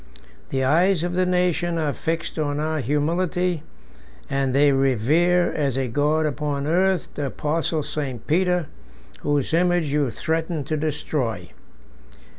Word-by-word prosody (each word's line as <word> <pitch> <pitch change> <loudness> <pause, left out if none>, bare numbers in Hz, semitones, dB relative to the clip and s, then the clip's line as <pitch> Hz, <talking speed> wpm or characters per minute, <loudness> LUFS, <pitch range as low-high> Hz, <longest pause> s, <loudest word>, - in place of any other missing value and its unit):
The 135 -1 0
eyes 170 +5 +3
of 175 0 -2
the 185 0 +1
nations 180 -1 +1
are 150 -3 0
fixed 165 +3 -3
on 145 -1 -1
our 155 +1 -1
humility; 170 +5 0 0.7
and 135 -1 +1
they 140 +2 +4
revere, 140 +7 +2
as 140 -4 -1
a 135 -1 0
God 150 +5 +1
upon 145 -1 -2
earth, 185 +3 +2
the 145 -2 -2
apostle 155 +3 -1
St. 135 -5 -4
Peter, 180 +1 +2 0.5
whose 145 0 0
image 175 -3 +2
you 145 -3 +2
threaten 160 +3 -2
to 155 +3 -2
destroy. 150 -5 -2
155 Hz, 135 wpm, -23 LUFS, 140-175 Hz, 0.7 s, they